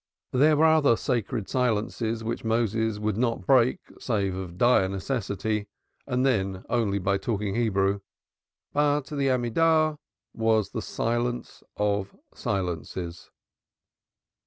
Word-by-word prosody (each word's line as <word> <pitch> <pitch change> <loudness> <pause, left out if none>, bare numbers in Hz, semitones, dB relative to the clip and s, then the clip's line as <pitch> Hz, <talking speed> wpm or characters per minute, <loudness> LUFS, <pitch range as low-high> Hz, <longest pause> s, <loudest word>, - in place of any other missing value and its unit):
There 150 +4 +4
were 160 - +5
other 155 -6 +5
sacred 120 -3 -2
silences 115 -2 -1
which 115 +1 -3
Moses 110 -1 0
would 105 -1 -1
not 115 -5 0
break 125 0 +4 0.2
save 100 -6 -1
of 90 -2 -6
dire 120 -4 +4
necessity 105 0 -2 0.4
and 125 -1 +1
then 95 -7 0
only 115 -4 +1
by 100 +1 0
talking 105 -2 -2
Hebrew; 100 -3 +1 0.7
but 145 -1 +2
the 140 -2 -1
Amidah 155 +5 +2 0.3
was 110 -2 +1
the - - -3
silence 120 +1 -2 0.2
of 100 -1 -1 0.2
silences. 90 -2 -4
115 Hz, 115 wpm, -26 LUFS, 100-125 Hz, 0.7 s, were